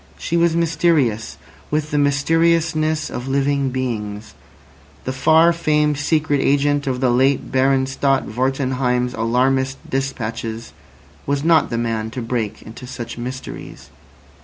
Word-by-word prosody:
She 170 - -3
was 170 -1 +3
mysterious, 155 -9 +1 0.3
with 150 0 -1
the 150 - +1
mysteriousness 155 +2 +1
of 125 - -5
living 140 0 +1
beings. 110 -5 -4 0.7
The 130 - -3
far 160 +5 +4
famed 150 -3 +1
secret 150 -1 +1
agent 145 +1 +2
[delta] 130 -2 0
of 125 - -7
the 125 -2 +3
late 130 +2 +2
Baron 130 0 +2
Stott 135 0 0
Wartenheim's 125 0 -1
alarmist 130 +4 +1
despatches 115 -4 -4 0.5
was 140 0 0
not 165 -1 +4
the 115 - -2
man 115 -2 -2
to - - -1
break 115 -3 -3
into 115 +3 -10
such 120 -2 -7
mysteries. 130 +2 -8
135 Hz, 135 wpm, -20 LUFS, 125-150 Hz, 0.7 s, far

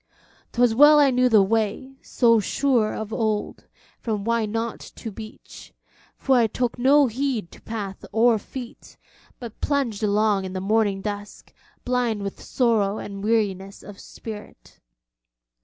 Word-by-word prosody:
'Twas 240 -1 +3
well 295 +5 +7
I 280 -2 +5
knew 250 0 +3
the 215 -4 +6
way, 225 +6 -2
so 230 -2 +3
sure 235 +1 +1
of 220 0 -6
old, 215 -2 -2 0.3
from 215 -3 -3
Why 230 0 0
Not? 225 +2 -3 0.2
to 225 - -7
beach; 215 +1 -12 0.4
for 265 -2 +2
I 235 -2 +4
took 245 +2 -3
no 280 +3 +5
heed 245 -6 -2
to - - -15
path 205 -4 -6
or 225 +1 +3
feet, 245 +3 -10 0.4
but 235 -3 -10
plunged 265 -8 -1
along 210 -1 +2
in 185 - -6
the 190 - -3
morning 200 0 +1
dusk, 205 0 -7 0.3
blind 245 -4 0
with 200 - -6
sorrow 220 -5 +1
and 200 -1 -7
weariness 200 -3 -1
of 205 -1 -11
spirit. 215 -2 -11
225 Hz, 145 wpm, -23 LUFS, 205-245 Hz, 0.4 s, well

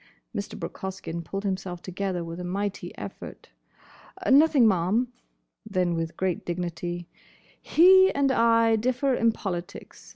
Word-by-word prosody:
Mr. 200 - -5
Brooke - - -7
Hoskyn 185 -3 -5
pulled 195 +4 -5
himself 190 -3 -3
together 185 -1 -3
with 165 +1 -7
a - - -5
mighty 200 +3 -3
effort. - - -9 0.8
"Nothing, 280 -3 +6
ma'am." 210 +6 +1 0.5
Then 185 -5 0
with 165 0 -3
great 185 -2 -1
dignity, 175 0 -4 0.5
"He 375 +3 +6
and 280 -1 +2
I 230 -2 +4
differ 255 +4 0
in 230 -2 +3
politics. 185 -3 -7
195 Hz, 130 wpm, -26 LUFS, 175-230 Hz, 0.8 s, Nothing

